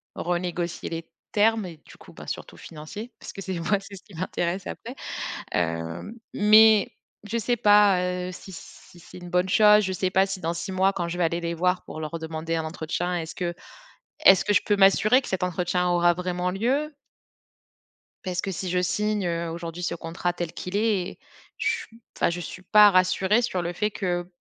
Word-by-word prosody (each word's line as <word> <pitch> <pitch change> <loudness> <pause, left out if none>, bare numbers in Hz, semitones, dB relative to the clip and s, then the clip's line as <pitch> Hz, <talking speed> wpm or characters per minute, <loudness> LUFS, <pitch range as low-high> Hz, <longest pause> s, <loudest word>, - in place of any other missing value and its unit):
renégocier 175 0 -3
les 165 0 -6 0.2
termes 220 0 +2
et 170 -3 -9
du - - -15
coup, - - -16
bah, - - -11
surtout - - -6
financiers 205 +10 -9
parce - - -9
que 195 - -8
c'est 190 -2 -4
moi, 195 +4 +1
c'est 195 0 -11
ce - - -16
qui 205 - -18
m'intéresse 175 +1 -2
après, 80 - -7 0.6
hem, 80 - -2 0.2
mais, 215 -1 +6 0.3
je 225 +3 -2
sais 240 +2 0
pas, 205 -3 +5
heu, 180 0 -2
si 190 - -11
si 175 0 -13
c'est 170 - -13
une 175 0 -9
bonne 180 +1 +1
chose. 210 +1 +6
Je 190 - -1
sais 185 0 -1
pas 190 0 +4
si 195 -1 -4
dans 165 +1 -1
6 190 - -5
mois, 190 +1 +2
quand 175 -2 -2
je 175 - -4
vais 175 - +1
aller 170 +1 -1
les 170 0 -2
voir 180 +2 +1
pour 155 - -8
leur 160 +2 -5
demander 160 +1 -4
un 160 - -1
entretien, 170 +2 -3
est-ce 160 0 -6
que 175 -2 -2 0.7
est-ce 190 -1 +7
que 205 - +1
je - - +4
peux 205 - +3
m'assurer 200 +5 +5
que - - -8
cet 190 -1 -2
entretien 180 0 0
aura 175 0 +4
vraiment 180 0 -2
lieu? 265 +11 0 1.3
Parce 180 -1 -2
que 195 - -4
si 185 +1 -4
je 180 0 +1
signe, 210 +2 0
heu, 170 -1 -2
aujourd'hui 170 +1 -6
ce - - -1
contrat 170 +1 -3
tel 175 -2 -5
qu'il 180 +2 -5
est 205 -4 +1
et - - -14 0.4
j 470 0 0 0.3
enfin, - - +2
je 175 - -4
suis 185 +1 -8
pas 210 +2 +7
rassurée 190 +4 +3
sur 185 -6 -1
le 170 0 -3
fait 210 +3 0
que 175 -4 -2
180 Hz, 205 wpm, -25 LUFS, 170-205 Hz, 1.3 s, est-ce